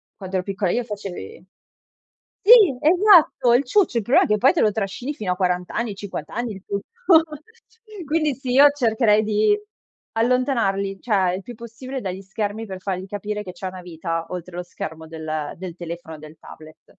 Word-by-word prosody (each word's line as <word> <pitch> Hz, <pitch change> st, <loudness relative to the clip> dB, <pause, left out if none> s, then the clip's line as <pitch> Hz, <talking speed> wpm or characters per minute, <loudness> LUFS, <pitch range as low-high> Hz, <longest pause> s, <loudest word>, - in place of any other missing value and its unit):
quando 190 Hz, -1 st, -7 dB
ero 180 Hz, -, -1 dB
piccola 195 Hz, -2 st, -1 dB
io, 245 Hz, -, 0 dB
facevi 195 Hz, -, -8 dB, 1.0 s
sì, 415 Hz, -, +8 dB
esatto, 345 Hz, -, +5 dB
il 255 Hz, +3 st, +3 dB
ciuccio. 365 Hz, -, +2 dB
Il 230 Hz, -, 0 dB
problema 245 Hz, -, +4 dB
è -, -, -7 dB
che 210 Hz, -, +2 dB
poi 265 Hz, -, +4 dB
te 340 Hz, -, +1 dB
lo 210 Hz, -, +4 dB
trascini 220 Hz, +7 st, -4 dB
fino 205 Hz, -10 st, -2 dB
a -, -, -7 dB
40 180 Hz, -1 st, -1 dB
anni, 230 Hz, -4 st, -2 dB
50 195 Hz, -6 st, -7 dB
anni 240 Hz, -2 st, -3 dB
il 190 Hz, -, -11 dB
tutto 200 Hz, 0 st, -4 dB, 1.2 s
quindi, 305 Hz, -2 st, 0 dB
sì, 260 Hz, -2 st, -5 dB
io 285 Hz, +2 st, +8 dB
cercherei 225 Hz, -6 st, +2 dB
di 215 Hz, -, +2 dB, 0.6 s
allontanarli, 225 Hz, -5 st, 0 dB
cioè, 190 Hz, -6 st, +1 dB
il 190 Hz, -, -6 dB
più 245 Hz, -, -9 dB
possibile 240 Hz, +4 st, -7 dB
dagli 190 Hz, 0 st, -5 dB
schermi, 205 Hz, +3 st, -4 dB
per 190 Hz, -2 st, -8 dB
fargli 190 Hz, -1 st, -3 dB
capire 210 Hz, +1 st, -4 dB
che 180 Hz, -, -7 dB
c'è 185 Hz, +1 st, -6 dB
una 185 Hz, 0 st, -8 dB
vita 165 Hz, -1 st, -4 dB
oltre 180 Hz, -1 st, -7 dB
lo 180 Hz, -, -3 dB
schermo 160 Hz, -2 st, -8 dB
del 155 Hz, -2 st, -5 dB
del 180 Hz, -1 st, -7 dB
telefono 170 Hz, -2 st, -7 dB
e -, -, -13 dB
del 155 Hz, +1 st, -13 dB
tablet. 155 Hz, 0 st, -15 dB
200 Hz, 185 wpm, -22 LUFS, 180-245 Hz, 1.2 s, sì